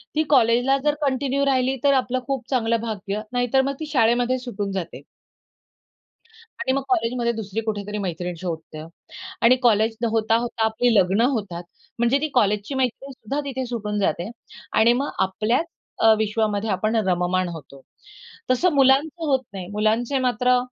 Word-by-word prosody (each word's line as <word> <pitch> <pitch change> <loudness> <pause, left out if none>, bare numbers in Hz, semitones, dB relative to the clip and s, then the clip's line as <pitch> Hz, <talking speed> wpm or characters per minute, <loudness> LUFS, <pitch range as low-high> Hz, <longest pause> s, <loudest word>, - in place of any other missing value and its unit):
ती 310 - +3
कॉलेजला 250 0 +4
जर 295 0 +2
कंटिन्यू 275 0 0
राहिली 265 -1 +1
तर 280 -1 +5
आपलं 255 -1 0
खूप 265 -3 -3
चांगलं 230 -3 +1
भाग्य 210 -2 -4
नाहीतर 245 +2 +2
मग 275 +1 -1
ती 315 - -4
शाळेमध्ये 245 0 +2
सुटून 205 -5 -4
जाते. 190 -3 -5 1.6
आणि 260 - 0
मग 275 - 0
कॉलेजमध्ये 235 0 +1
दुसरी 220 -1 -4
कुठेतरी 210 -1 -4
मैत्रीण 180 -2 -4
शोधते. 160 -3 -6 0.6
आणि 235 +2 +7
कॉलेज 220 -1 +3 0.2
होता-होता 225 +1 +1
आपली 225 +2 +1
लग्न 195 +2 +3
होतात. 200 -8 -4 0.4
म्हणजे 240 +3 +3
ती 310 - 0
कॉलेजची 210 -1 +1
मैत्रीण 265 +2 -2
सुद्धा 260 +2 -5
तिथे 265 -2 -3
सुटून 210 -4 -3
जाते. 175 0 -1 0.5
आणि 235 +2 +5
मग 285 - -3 0.2
आपल्याच 220 - 0 0.4
अ, 225 0 +7
विश्वामध्ये 215 0 -1
आपण 215 +4 0
रममाण 180 0 +1
होतो. 140 -4 -10 0.7
तसं 255 +9 +3
मुलांचं 280 +5 +3
होत 275 -3 +2
नाही. 185 -2 -6
मुलांचे 220 +6 0
मात्र 250 0 +2
230 Hz, 150 wpm, -23 LUFS, 205-260 Hz, 1.6 s, आणि